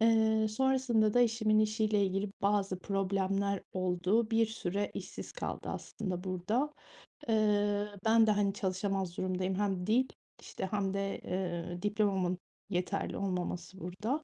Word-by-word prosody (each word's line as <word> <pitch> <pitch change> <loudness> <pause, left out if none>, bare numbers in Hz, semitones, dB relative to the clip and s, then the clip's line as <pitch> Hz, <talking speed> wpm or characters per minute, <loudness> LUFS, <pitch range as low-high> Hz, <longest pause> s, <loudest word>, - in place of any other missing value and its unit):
Eee, 220 -1 +4
sonrasında 240 -2 +2
da 245 - +5
eşimin 220 -2 +3
işiyle 215 -1 +2
ilgili 195 +2 -1
bazı 200 -2 +1
problemler 195 0 0
oldu. 185 +5 +1
Bir 225 0 +4
süre 205 -2 -2
işsiz - - -7
kaldı - - -5
aslında 185 -4 -4
burada. 205 +10 0 0.6
Eee, 205 -2 +2 0.2
ben 225 0 +6
de, - - +5
hani, 205 -1 +2
çalışamaz 190 -2 -2
durumdayım. 185 0 -1
Hem 195 -2 -1
dil 250 +4 +3 0.3
işte - - -5
hem 195 -2 0
de, 195 0 -2
eee, 175 -1 -3
diplomamın 200 -3 +1 0.3
yeterli 185 +1 -1
olmaması 180 -1 -3
burada. 215 - -3
200 Hz, 130 wpm, -32 LUFS, 185-220 Hz, 0.6 s, ben